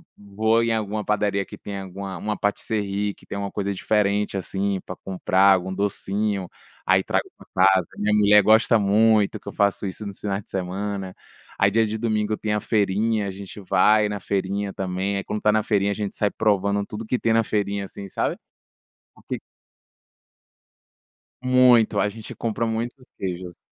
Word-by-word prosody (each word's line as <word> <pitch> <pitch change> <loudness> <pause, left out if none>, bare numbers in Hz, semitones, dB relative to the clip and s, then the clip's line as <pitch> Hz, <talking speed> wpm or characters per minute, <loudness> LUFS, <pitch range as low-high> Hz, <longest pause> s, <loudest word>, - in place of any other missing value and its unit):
vou 110 +3 +1
em 115 -1 +1
alguma 105 -1 -2
padaria 100 -1 0
que - - -11
tenha 100 -1 -6
alguma 95 0 -7
uma 105 +2 -3
pâtisserie 105 -1 -1
que - - -20
tenha 100 - -5
uma 100 - -4
coisa 100 0 -2
diferente, 105 0 0
assim, 95 +1 -2
pra 95 - -6
comprar, 95 +1 +3
algum 95 0 -1
docinho, 100 0 -1 0.4
aí - - +4
trago - - -1
pra - - -17 0.2
casa, 95 -3 +4
minha 105 +1 +1
mulher 105 0 +6
gosta 110 +1 +5
muito 105 0 +3
que - - -21
eu - - -5
faço 100 0 +1
isso 105 +3 -6
nos 100 -1 -7
finais 100 -1 -3
de - - -22
semana, 95 +1 -3 0.4
aí 100 0 +3
dia 110 +2 +3
de 110 - -3
domingo 110 -1 0
tem 105 -1 -2
a 105 - +1
feirinha, 105 +1 +1
a 95 - -3
gente 100 +1 -9
vai 105 +3 +3
na 105 0 -4
feirinha 100 +1 -2
também, 95 +1 -2
aí 100 - -3
quando 105 0 -4
tá 105 - +4
na 110 0 +2
feirinha 100 -2 +1
a - - 0
gente 105 -1 -4
sai 105 - +1
provando 100 -1 +1
tudo 105 +2 -7
que 125 +3 0
tem 115 - +1
na 115 0 +4
feirinha, 100 -2 -1
assim, 100 +1 -9
sabe? - - -2 0.8
O - - -19
que - - -3 2.0
Muito, 125 -3 +5
a - - +2
gente 110 +1 -9
compra 115 0 -2
muitos 115 +3 -3
queijos. 90 -2 -5
100 Hz, 180 wpm, -23 LUFS, 100-110 Hz, 2.0 s, mulher